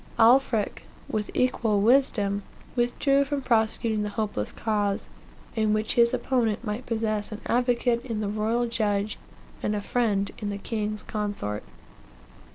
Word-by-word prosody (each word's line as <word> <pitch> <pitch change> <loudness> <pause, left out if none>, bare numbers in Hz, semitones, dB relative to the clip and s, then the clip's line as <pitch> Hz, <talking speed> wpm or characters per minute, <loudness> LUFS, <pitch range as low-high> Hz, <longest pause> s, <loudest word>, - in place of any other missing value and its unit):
Alfric, 235 -2 +3 0.2
with 210 -1 -2
equal 230 -4 +2
wisdom, 205 -4 +3 0.3
withdrew 275 +3 +2
from 280 -1 -3
prosecuting 220 -2 +1
the 210 - -1
hopeless 205 - -2
cause, 205 -3 -1 0.5
in 215 -2 +2
which 215 0 0
his 235 0 +5
opponent 235 -4 0
might 220 +2 -4
possess 220 -2 -1
an 215 - -5
advocate 245 -1 +2
in 230 -4 -3
the 210 - -1
royal 220 +3 0
judge, 210 -3 -1 0.4
and 210 - 0
a - - 0
friend 205 -3 0
in 205 - -3
the 200 - -3
king's 210 0 -3
consort. 205 - -3
220 Hz, 140 wpm, -26 LUFS, 210-240 Hz, 0.5 s, his